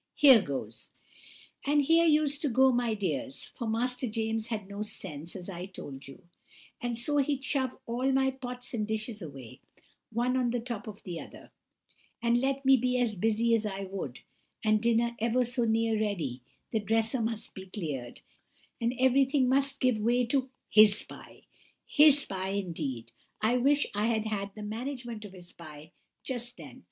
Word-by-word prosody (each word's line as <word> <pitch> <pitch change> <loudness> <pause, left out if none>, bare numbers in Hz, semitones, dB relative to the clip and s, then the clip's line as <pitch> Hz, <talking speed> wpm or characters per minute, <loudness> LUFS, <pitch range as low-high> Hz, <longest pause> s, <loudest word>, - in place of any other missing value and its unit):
Here 265 -6 +8
goes!' 140 -7 -6 0.7
And 290 +1 +3
here 330 +3 +4
used 300 -2 +2
to 295 - +1
go, 260 +2 +5
my 240 -2 +1
dears, 270 +7 -3
for 235 - -5
Master 250 +3 0
James 225 0 -2
had 215 -4 -4
no 200 +1 -6
sense, 170 -6 -5
as 180 -2 -7
I 180 -1 -6
told 140 -8 -9
you; 140 +7 -13 0.6
and 240 -1 -2
so 290 +5 +1
he'd 280 -1 +1
shove 270 -4 0
all 250 +3 0
my 265 0 +3
pots 250 -2 -7
and 215 -3 -1
dishes 215 0 -2
away, 135 -8 -10 0.5
one 240 +3 0
on 250 -2 +1
the 245 +1 -1
top 235 -1 -6
of 210 -1 -9
the 175 -3 -5
other; - - -12 0.7
and 235 +1 +2
let 275 +1 -1
me 270 0 +7
be 250 +1 +1
as 240 -3 +1
busy 225 +4 +2
as 225 -1 +3
I 200 -2 -3
would, 185 -10 -6 0.4
and 215 -1 +3
dinner 235 0 +2
ever 235 +3 +2
so 245 0 0
near 225 -1 +1
ready, 160 - -2 0.3
the 220 - +1
dresser 225 +4 +1
must 225 -1 -2
be 190 0 -9
cleared, 150 - -5 0.6
and 235 +2 0
everything 260 +1 +4
must 275 +1 +2
give 255 -4 +2
way 240 +3 +2
to 260 +2 0 0.2
his 215 -1 +6
pie! - - -13 0.4
His 295 -2 +5
pie, 190 0 -4
indeed—I 160 - -3
wish 285 +3 +3
I 210 +2 +1
had 225 -2 0
had 200 -2 -3
the 215 - -7
management 235 0 -5
of 195 - -10
his 180 -2 -11
pie 155 -1 -12 0.3
just 245 -2 -4
then! 145 -7 -11
230 Hz, 175 wpm, -29 LUFS, 200-255 Hz, 0.7 s, Here